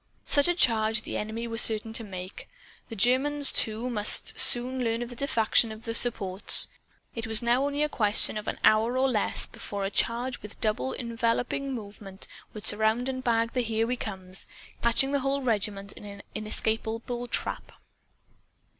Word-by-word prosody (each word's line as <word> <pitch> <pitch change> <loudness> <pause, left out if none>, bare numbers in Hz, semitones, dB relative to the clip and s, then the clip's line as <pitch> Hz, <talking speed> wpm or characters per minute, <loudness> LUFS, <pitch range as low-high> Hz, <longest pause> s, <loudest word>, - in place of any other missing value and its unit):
Such 285 +1 +4
a 350 - +1
charge 220 -6 +2
the - - -6
enemy 220 +2 -4
were 230 0 -2
certain 220 0 +3
to 230 - -1
make. 185 -2 -9 0.4
The 225 - -7
Germans, 265 +6 +5
too, 220 +2 +1
must 210 -4 +2
soon 250 +1 +2
learn 230 0 -1
of 240 - -8
the 245 - -9
defection 230 -3 +2
of 220 +1 -10
the 230 - -4
supports. 205 -5 +3 0.4
It 225 -1 -5
was 220 +1 +3
now 240 +3 +2
only 285 +1 -1
a - - +1
question 215 -8 +3
of 210 - -6
an - - -3
hour 225 +4 +3
or 265 +1 +2
less 225 -6 -1
before 200 -1 -6
a 195 - -3
charge 240 +4 -1
with 210 - -9
a - - -14
double 210 - -1
enveloping 235 +3 -2
movement 205 -4 -6 0.3
would 215 - -8
surround 220 +4 +1
and 260 -1 -5
bag 230 -1 0
the 250 - 0
Here 225 -1 -1
We 250 +2 -2
Comes, 190 -5 -2 0.3
catching 235 +4 +2
the 285 - +1
whole 275 +1 -2
regiment 205 -4 -2
in - - -12
an 200 0 -10
inescapable 225 +3 -3
trap. - - -2
230 Hz, 180 wpm, -27 LUFS, 215-250 Hz, 0.4 s, Germans